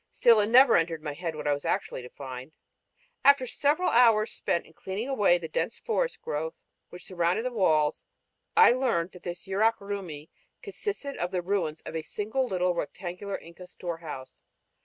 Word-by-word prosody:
Still 230 Hz, -2 st, +5 dB
it 205 Hz, -, +2 dB
never 250 Hz, +2 st, +7 dB
entered 165 Hz, -2 st, -1 dB
my 150 Hz, -2 st, -3 dB
head 165 Hz, +1 st, -4 dB
what 150 Hz, -, -6 dB
I 145 Hz, -, +3 dB
was 145 Hz, -, -4 dB
actually -, -, -2 dB
to 125 Hz, -, -10 dB
find. 130 Hz, +1 st, -8 dB, 0.7 s
After 280 Hz, -1 st, +6 dB
several 295 Hz, +8 st, +1 dB
hours 230 Hz, -2 st, +5 dB
spent 185 Hz, -3 st, -1 dB
in 160 Hz, -, -19 dB
clearing 195 Hz, +8 st, -5 dB
away 205 Hz, -10 st, +3 dB
the 170 Hz, -2 st, -6 dB
dense 155 Hz, -, -2 dB
forest -, -, -2 dB
growth 160 Hz, +2 st, -3 dB, 0.3 s
which 180 Hz, 0 st, -11 dB
surrounded 180 Hz, +5 st, 0 dB
the 255 Hz, -, -1 dB
walls 155 Hz, -8 st, +2 dB, 0.5 s
I 450 Hz, -, +8 dB
learned 235 Hz, -9 st, 0 dB
that 180 Hz, -, -13 dB
this 175 Hz, -1 st, -6 dB
Yurak 215 Hz, +4 st, +2 dB
Rumi 185 Hz, -7 st, -6 dB, 0.3 s
consisted 395 Hz, -8 st, -5 dB
of 175 Hz, -, -1 dB
the 180 Hz, -1 st, -2 dB
ruins 170 Hz, -5 st, -1 dB
of -, -, -8 dB
a 160 Hz, -, -1 dB
single 220 Hz, +10 st, -2 dB
little 180 Hz, -3 st, +1 dB
rectangular 180 Hz, +3 st, -5 dB
Inca 170 Hz, +2 st, -13 dB
storehouse. 165 Hz, -8 st, -7 dB
180 Hz, 180 wpm, -28 LUFS, 165-230 Hz, 0.7 s, I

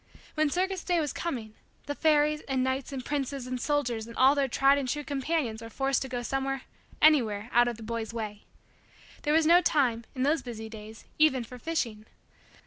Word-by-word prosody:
When 310 Hz, -1 st, +2 dB
circus 370 Hz, +3 st, -1 dB
day 350 Hz, -2 st, +1 dB
was 300 Hz, -3 st, -1 dB
coming, 235 Hz, -10 st, -4 dB, 0.3 s
the 290 Hz, -, -3 dB
fairies 300 Hz, 0 st, +2 dB
and 265 Hz, -1 st, 0 dB
knights 260 Hz, +1 st, -2 dB
and 265 Hz, -2 st, -5 dB
princes 275 Hz, -2 st, -2 dB
and 255 Hz, -1 st, -4 dB
soldiers 245 Hz, -7 st, -1 dB
and 230 Hz, -, -10 dB
all 265 Hz, +2 st, +6 dB
their 280 Hz, -2 st, +1 dB
tried 275 Hz, +3 st, +4 dB
and 265 Hz, -2 st, -3 dB
true 295 Hz, +3 st, -2 dB
companions 275 Hz, -5 st, -2 dB
were 230 Hz, -, -8 dB
forced 270 Hz, +3 st, 0 dB
to 265 Hz, -, -4 dB
go 245 Hz, -1 st, -3 dB
somewhere 270 Hz, +1 st, -2 dB, 0.4 s
anywhere 230 Hz, -8 st, +4 dB
out 240 Hz, 0 st, +5 dB
of 240 Hz, -2 st, -3 dB
the 225 Hz, -, -10 dB
boy's 230 Hz, 0 st, -4 dB
way. 215 Hz, -3 st, -5 dB, 0.8 s
There 295 Hz, -, +1 dB
was 320 Hz, -1 st, +4 dB
no 345 Hz, +3 st, +7 dB
time, 250 Hz, -9 st, +1 dB
in 255 Hz, -, -1 dB
those 300 Hz, +4 st, +2 dB
busy 220 Hz, -3 st, -7 dB
days, 220 Hz, 0 st, -11 dB
even 270 Hz, -5 st, +4 dB
for 250 Hz, +2 st, -11 dB
fishing. 230 Hz, -9 st, -3 dB
265 Hz, 200 wpm, -28 LUFS, 230-295 Hz, 0.8 s, no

